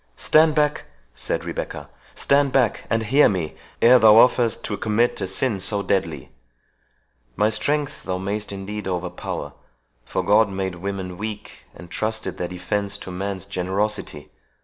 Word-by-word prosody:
"Stand 155 Hz, 0 st, +4 dB
back," 150 Hz, -1 st, +1 dB, 0.3 s
said -, -, -3 dB
Rebecca—"stand 140 Hz, -1 st, -2 dB
back, 125 Hz, -5 st, +1 dB
and 115 Hz, -1 st, +1 dB
hear 135 Hz, +7 st, +5 dB
me 85 Hz, -6 st, -3 dB, 0.3 s
ere 125 Hz, +2 st, +8 dB
thou 110 Hz, -2 st, +7 dB
offerest 120 Hz, 0 st, +4 dB
to 105 Hz, -, -2 dB
commit 110 Hz, +3 st, 0 dB
a 95 Hz, -, -1 dB
sin 105 Hz, +2 st, 0 dB
so 100 Hz, +1 st, 0 dB
deadly! 100 Hz, -2 st, -2 dB, 1.0 s
My 105 Hz, +2 st, +2 dB
strength 145 Hz, +5 st, -1 dB
thou 90 Hz, -, -3 dB
mayst 100 Hz, +3 st, -3 dB
indeed 100 Hz, +1 st, -6 dB
overpower 90 Hz, -1 st, -4 dB, 0.5 s
for 95 Hz, -, -3 dB
God 105 Hz, +3 st, +4 dB
made 95 Hz, -1 st, -3 dB
women 90 Hz, 0 st, -5 dB
weak, 105 Hz, 0 st, -7 dB
and 85 Hz, -, -12 dB
trusted 110 Hz, +3 st, -3 dB
their 90 Hz, -, -2 dB
defence 100 Hz, +3 st, -2 dB
to 95 Hz, -, -9 dB
man's 95 Hz, +1 st, -4 dB
generosity. 95 Hz, -4 st, -3 dB
100 Hz, 145 wpm, -22 LUFS, 95-115 Hz, 1.0 s, ere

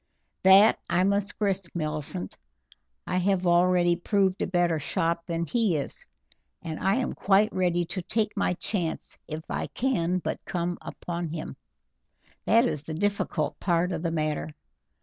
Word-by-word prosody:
"That 195 Hz, +3 st, +7 dB
I 180 Hz, +1 st, +3 dB
must 200 Hz, +1 st, 0 dB
risk, 195 Hz, -4 st, -1 dB
Millicent. 150 Hz, -, -3 dB, 0.7 s
I 180 Hz, -, -1 dB
have 185 Hz, 0 st, +1 dB
already 175 Hz, 0 st, +4 dB
proved 190 Hz, +1 st, +1 dB
a -, -, 0 dB
better 175 Hz, -3 st, +1 dB
shot 165 Hz, +3 st, -1 dB
than 170 Hz, 0 st, -1 dB
he 220 Hz, -2 st, +1 dB
is, 140 Hz, -, -2 dB, 0.6 s
and 160 Hz, -2 st, -5 dB
I 195 Hz, +2 st, +2 dB
am 255 Hz, 0 st, -1 dB
quite 205 Hz, +2 st, +3 dB
ready 175 Hz, -2 st, +1 dB
to 185 Hz, -, -4 dB
take 215 Hz, +4 st, -1 dB
my 180 Hz, -, +1 dB
chance 175 Hz, -3 st, -3 dB
if 155 Hz, 0 st, -5 dB
I -, -, -3 dB
can 185 Hz, -9 st, 0 dB
but 180 Hz, -, -4 dB
come 175 Hz, 0 st, -3 dB
upon 170 Hz, -1 st, -5 dB
him; 155 Hz, 0 st, -6 dB, 0.9 s
that 230 Hz, +2 st, +5 dB
is 150 Hz, -, -1 dB
the 155 Hz, +1 st, -6 dB
difficult 200 Hz, -5 st, -1 dB
part 175 Hz, 0 st, +1 dB
of 165 Hz, -2 st, -3 dB
the 170 Hz, -, -1 dB
matter. 155 Hz, -2 st, -1 dB
175 Hz, 155 wpm, -27 LUFS, 165-195 Hz, 0.9 s, That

